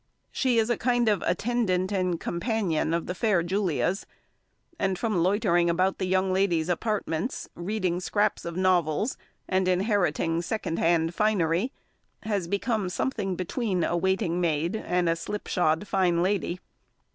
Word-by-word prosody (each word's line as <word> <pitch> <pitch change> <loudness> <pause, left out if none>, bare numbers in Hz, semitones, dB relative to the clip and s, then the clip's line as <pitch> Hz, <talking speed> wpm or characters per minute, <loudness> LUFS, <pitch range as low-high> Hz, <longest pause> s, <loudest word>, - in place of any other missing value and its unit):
She 255 -3 +1
is 225 +1 +2
a 240 - +1
kind 240 -1 +2
of 205 -4 +2
attendant 190 -1 0
and 185 -4 0
companion 175 -4 -1
of 170 0 0
the 180 - -3
fair 190 -2 +1
Julia's; 185 0 -1 0.7
and 190 -1 0
from 215 -6 0
loitering 175 -2 +2
about 185 +3 +1
the 185 - -1
young 185 0 +1
lady's 180 -4 +1
apartments, 195 +1 -2
reading 185 -1 -2
scraps 205 +3 0
of 170 0 -5
novels, 185 - +1 0.3
and 185 -1 +1
inheriting 180 -4 +1
second 175 -2 -3
hand 165 0 +2
finery, 200 +2 +1 0.5
has 205 -5 -1
become 200 +1 -1
something 195 -2 -2
between 185 0 -1
a - - 0
waiting 180 -1 0
maid 165 +2 0
and 180 -5 0
a 165 - +2
slip 205 +5 -5
shod 170 +2 +1
fine 175 -3 +2
lady. 185 -2 -1
185 Hz, 145 wpm, -27 LUFS, 170-210 Hz, 0.7 s, is